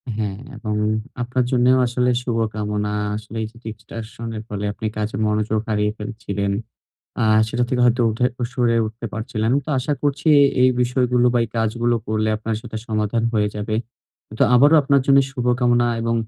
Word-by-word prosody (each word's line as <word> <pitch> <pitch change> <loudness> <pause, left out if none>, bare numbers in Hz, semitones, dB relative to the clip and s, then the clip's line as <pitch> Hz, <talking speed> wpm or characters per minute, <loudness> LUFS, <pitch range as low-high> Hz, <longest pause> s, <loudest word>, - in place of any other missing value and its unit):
হ্যাঁ 105 -3 -2 0.2
এবং 110 -2 -3 0.5
আপনার 125 +1 0
জন্যেও 125 0 +4
আসলে 125 +1 0
শুভকামনা। 105 -3 -2 0.2
আসলে 110 +1 -7
এই - - -3
যে 115 - -19 0.2
distraction 110 +2 -8
এর 110 - -6
ফলে 105 0 -3
আপনি 110 - -7
কাজে 105 +1 -2
মনোযোগ 105 0 0
হারিয়ে 105 -1 +1
ফেলছিলেন 100 -2 -3 0.7
আ - - +2 0.3
সেটা 120 +2 0
থেকে 125 0 0
হয়তো 120 +1 +3
উঠে 115 +3 -1 0.3
সরে 120 -3 +1
উঠতে 110 +2 -7
পারছিলেন। 110 0 -2
তো - - -11
আশা 135 +4 -1
করছি 145 +1 0 0.3
এই 130 - +6
বিষয়গুলো 125 0 +2
বা - - +4
এই - - -8
কাজগুলো 115 +2 +1
করলে 110 0 0
আপনার 110 +1 -3
সেটা 115 -2 -7
সমাধান 110 0 -1
হয়ে 105 -2 +1
যাবে। 105 +1 -3 0.6
তো - - +4
আবারো 145 +6 +6
আপনার 140 0 +3
জন্য 140 0 +6
শুভকামনা 120 -1 +1
এবং 115 0 0
115 Hz, 165 wpm, -21 LUFS, 110-125 Hz, 0.7 s, এই